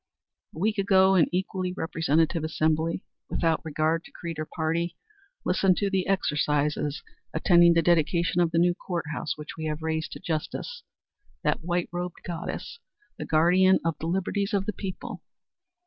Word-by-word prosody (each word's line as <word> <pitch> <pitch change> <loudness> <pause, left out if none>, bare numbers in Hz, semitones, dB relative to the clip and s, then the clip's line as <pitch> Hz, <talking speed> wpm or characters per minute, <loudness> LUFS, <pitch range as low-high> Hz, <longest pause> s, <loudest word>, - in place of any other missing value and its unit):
A - - -10
week 210 +4 0
ago 195 -1 +5
an 180 -4 +5
equally 185 0 -2
representative 165 -1 +1
assembly, 160 +2 0 0.3
without 165 -2 +1
regard 160 +1 0
to - - -14
creed 165 -2 -6
or 155 - -3
party, 165 +1 -2 0.5
listened 185 -2 +3
to 200 -1 0
the 190 -2 0
exercises 150 -5 0 0.3
attending 170 +1 +6
the 165 - +4
dedication 170 +1 +2
of 170 - +3
the 165 - -1
new 175 +1 +4
Court 175 -2 -4
House 155 - -3
which 150 0 -8
we 160 - -4
have 155 +1 -3
raised 160 0 -2
to - - -8
Justice 185 - -4 0.6
that 150 0 0
white 175 0 0
robed 175 0 -5
goddess, 175 - -5 0.4
the - - -4
guardian 180 +4 +4
of 165 -1 +1
the 160 - -3
liberties 195 +3 -1
of 195 -1 0
the 215 - -2
people. 190 -2 -6
170 Hz, 165 wpm, -27 LUFS, 160-185 Hz, 0.6 s, attending